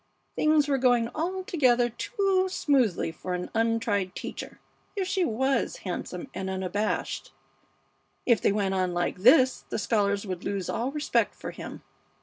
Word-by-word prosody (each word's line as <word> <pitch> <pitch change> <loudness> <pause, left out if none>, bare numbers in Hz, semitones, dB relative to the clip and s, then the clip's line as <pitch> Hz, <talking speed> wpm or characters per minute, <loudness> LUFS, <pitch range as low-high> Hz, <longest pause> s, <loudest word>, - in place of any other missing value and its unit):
Things 305 -1 +3
were 275 -2 +1
going 245 -2 +3
altogether 315 -9 +1
too 385 - 0
smoothly 255 - +1
for 180 +2 -4
an 180 0 -5
untried 225 -5 0
teacher, - - -7 0.4
if 385 -2 -1
she 380 -1 +1
was 265 -1 0
handsome 290 - -4
and 190 0 -4
unabashed. 190 +3 -2 0.9
If 235 -4 +4
they - - +3
went 200 -2 0
on 185 -2 0
like 175 +1 -1
this 255 - +5
the - - -2
scholars 200 -1 +1
would 185 -2 -5
lose 195 -3 -2
all 245 +4 -1
respect 300 +1 0
for - - -6
him. - - -9
230 Hz, 145 wpm, -27 LUFS, 195-290 Hz, 0.9 s, this